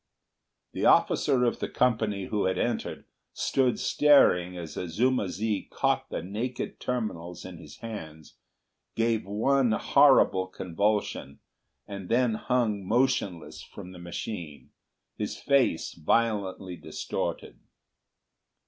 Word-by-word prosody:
The - - -3
officer 125 -2 +3
of 120 - +1
the - - -3
company 110 -5 0
who 105 -1 -1
had 95 - 0
entered, - - -2 0.3
stood 130 -3 +1
staring 90 -12 +4
as 85 -3 -7
Azuma 105 +5 0
zi 105 +2 -2
caught - - 0
the - - -4
naked 115 +7 -4
terminals 90 -9 -4
in 90 -3 -9
his - - -12
hands, 80 -9 -8 0.6
gave 115 -3 0
one 120 +4 +2
horrible 95 -3 +4
convulsion, 95 -5 -2 0.5
and 100 -3 -7
then 120 -1 +2
hung 110 -3 0
motionless 110 -5 0
from 90 - -11
the 90 - -11
machine, 85 - -7 0.5
his - - -3
face 135 - +1
violently 95 0 0
distorted. - - -5
105 Hz, 110 wpm, -27 LUFS, 90-120 Hz, 0.6 s, staring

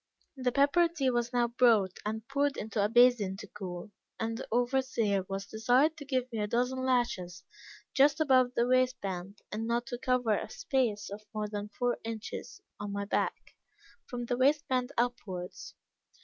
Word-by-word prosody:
"The 255 -2 0
pepper 285 +6 +4
tea 290 -6 0
was 240 -1 0
now 240 -1 +2
brought, 230 -6 +3
and 220 +2 -4
poured 280 +1 0
into 210 -1 -1
a 205 - +2
basin 235 -5 +4
to 210 - -8
cool, 190 -1 -7 0.3
and 225 0 -1
the 250 - -6
overseer 240 -5 +1
was 195 0 -3
desired 245 +9 +2
to 290 - -8
give 255 -2 -1
me 225 - -3
a 210 - 0
dozen 250 +3 0
lashes 195 -9 0 0.5
just 280 +2 +4
above 255 -4 +4
the 235 - +3
waist 255 0 +3
band; 195 +1 -6
and 220 +2 -3
not 235 +1 0
to 245 - -5
cover 250 -4 +2
a - - -4
space 230 -7 -1
of 210 +1 -8
more 210 0 -1
than 205 0 -5
four 245 +3 -1
inches 225 -1 -6 0.2
on 205 0 -4
my 200 0 -2
back, 200 - -2 0.5
from 245 -2 -4
the 245 0 -1
waist 285 +4 +3
band 255 0 0
upwards. 205 -7 -3
240 Hz, 175 wpm, -31 LUFS, 210-255 Hz, 0.5 s, pepper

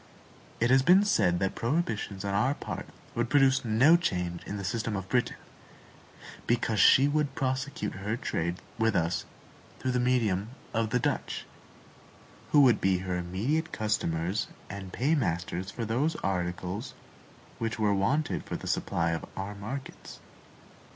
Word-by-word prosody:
It 120 +2 +2
has 130 0 +6
been 185 +8 +6
said 90 - +3
that 95 +1 0
prohibitions 115 - -2
on 100 - -1
our 130 +8 +2
part - - -6 0.3
would 120 0 -1
produce 135 -1 +4
no 125 +8 +5
change 90 - -1
in 105 - -4
the 100 - -5
system 110 +2 -2
of 95 -1 -4
Britain, 120 +4 +1 1.1
because 115 -2 +1
she 135 +2 +7
could 145 -2 0
prosecute 130 -4 -2
her 105 +4 -3
trade 85 -7 -2 0.2
with 115 0 +2
us 85 0 0 0.5
through 130 - -2
the 125 - +1
medium 115 -5 +1 0.2
of 115 -1 0
the 125 - +2
Dutch, - - -2 1.1
who 145 - +7
would 125 -6 +5
be 95 -1 +3
her 90 -1 -1
immediate 105 - -1
customers 95 -3 -1 0.2
and 100 -2 -7
paymasters 95 - 0
for 115 - -4
those 135 +9 0
articles 90 +2 -2 0.6
which 115 +1 -2
were 105 -2 +2
wanted 135 +11 0
for - - -5
the - - -7
supply 85 -1 0
of 80 - -3
our 100 +2 -4
markets. 110 +7 -7
110 Hz, 150 wpm, -29 LUFS, 95-130 Hz, 1.1 s, she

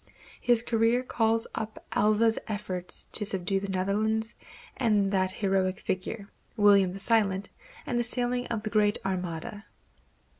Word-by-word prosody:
His 240 -1 +2
career 230 +2 +2
calls 225 -2 +1
up 220 0 -6
Alva's 215 +2 +3
efforts 200 -4 -4
to 215 - -2
subdue 195 -1 +2
the 195 0 -6
Netherlands, 215 +4 -1 0.4
and 210 -5 +1
that 185 -1 +1
heroic 190 -1 0
figure, 200 +3 -4 0.3
William 200 -3 +5
the 195 - -7
Silent; 200 -3 +1 0.3
and 240 - -1
the - - +1
sailing 245 +1 +1
of 225 -3 -3
the 215 - -4
Great 210 -1 +2
Armada. 190 +3 -4
210 Hz, 140 wpm, -28 LUFS, 195-225 Hz, 0.4 s, William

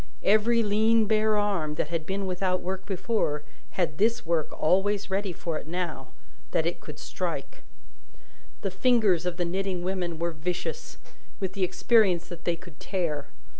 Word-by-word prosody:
Every 225 +3 +4
lean 220 +2 +4
bare 215 0 +3
arm, 190 -8 0
that 150 - -1
had 165 -2 -2
been 195 +1 -1
without 185 0 0
work 190 +1 -4
before, 190 -6 0 0.3
had 160 -5 0
this 230 +3 +2
work 165 -2 +1
always 195 +4 +2
ready 195 0 0
for 165 -1 -3
it - - -11
now, 170 -6 -3 0.4
that - - +1
it - - -1
could - - -9
strike. - - -4 1.0
The 195 - -1
fingers 195 -5 +3
of 175 -1 -2
the 175 - +1
knitting 185 0 -1
women 180 -3 -2
were 170 +1 -1
vicious, 175 - -4 0.4
with 190 -2 -2
the 195 -1 0
experience 185 -2 +3
that 175 -2 -9
they 170 - +2
could 170 -2 -14
tear. 155 -7 -2
185 Hz, 165 wpm, -27 LUFS, 170-205 Hz, 1.0 s, Every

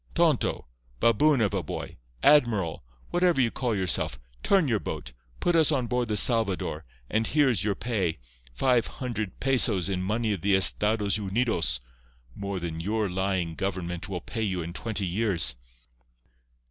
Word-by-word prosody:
—tonto—baboon 65 - +1
of 105 -4 +1
a - - 0
boy—admiral, 85 - +1 0.3
whatever 175 -4 +2
you 120 -3 +3
call 120 -4 -1
yourself, 90 -9 0 0.2
turn 195 -6 +3
your 115 -5 +1
boat. - - -6 0.3
Put 175 - +1
us 160 -2 +4
on 130 -5 +1
board 125 0 -1
the 105 -1 -1
Salvador, 100 -10 +1 0.2
and 110 - 0
here 145 -3 +3
is 105 -6 +1
your 100 -1 0
pay—five 85 - -1
hundred 110 -6 -5
pesos 120 -9 +2
in 95 -2 -1
money 110 +3 0
of 95 - -5
the 100 +1 +3
Estados 105 +1 +2
Unidos—more 60 - -3
than 85 -2 -5
your 105 +1 -1
lying 95 -3 -1
government 90 +1 -4
will 90 -3 -4
pay 115 - -5
you 95 -5 -1
in 85 +1 -7
twenty 105 -1 -3
years." 90 - +2
100 Hz, 145 wpm, -27 LUFS, 85-115 Hz, 0.3 s, us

